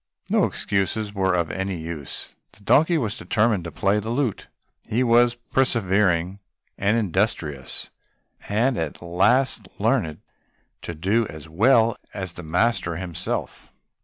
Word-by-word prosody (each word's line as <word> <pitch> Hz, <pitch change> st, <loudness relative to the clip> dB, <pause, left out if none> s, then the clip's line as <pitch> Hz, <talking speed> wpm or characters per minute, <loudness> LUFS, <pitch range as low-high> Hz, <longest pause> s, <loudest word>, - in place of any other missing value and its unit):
No -, -, +4 dB
excuses 100 Hz, +2 st, -1 dB
were 95 Hz, -2 st, +1 dB
of 85 Hz, -3 st, 0 dB
any 95 Hz, +1 st, -3 dB
use. 80 Hz, -4 st, -6 dB, 0.2 s
The 100 Hz, -, -20 dB
donkey 160 Hz, -, +4 dB
was 115 Hz, -6 st, -1 dB
determined 110 Hz, -4 st, +1 dB
to 85 Hz, -, -5 dB
play 100 Hz, +5 st, +1 dB
the 110 Hz, +2 st, -5 dB
lute; 120 Hz, -3 st, -1 dB, 0.4 s
he 120 Hz, +4 st, +1 dB
was 120 Hz, 0 st, +4 dB
persevering 100 Hz, -7 st, +1 dB, 0.4 s
and 105 Hz, +3 st, +1 dB
industrious, 90 Hz, -, -1 dB, 0.6 s
and 115 Hz, +5 st, +1 dB
at 80 Hz, +1 st, -4 dB
last 105 Hz, +6 st, +2 dB
learnt 105 Hz, -, 0 dB, 0.6 s
to 85 Hz, -, -6 dB
do 100 Hz, +8 st, +1 dB
it -, -, -9 dB
as 80 Hz, 0 st, -9 dB
well 115 Hz, +6 st, +3 dB, 0.2 s
as 95 Hz, -3 st, -4 dB
the 85 Hz, -, -9 dB
master 90 Hz, +1 st, 0 dB
himself. 85 Hz, -1 st, -4 dB
100 Hz, 135 wpm, -24 LUFS, 85-115 Hz, 0.6 s, No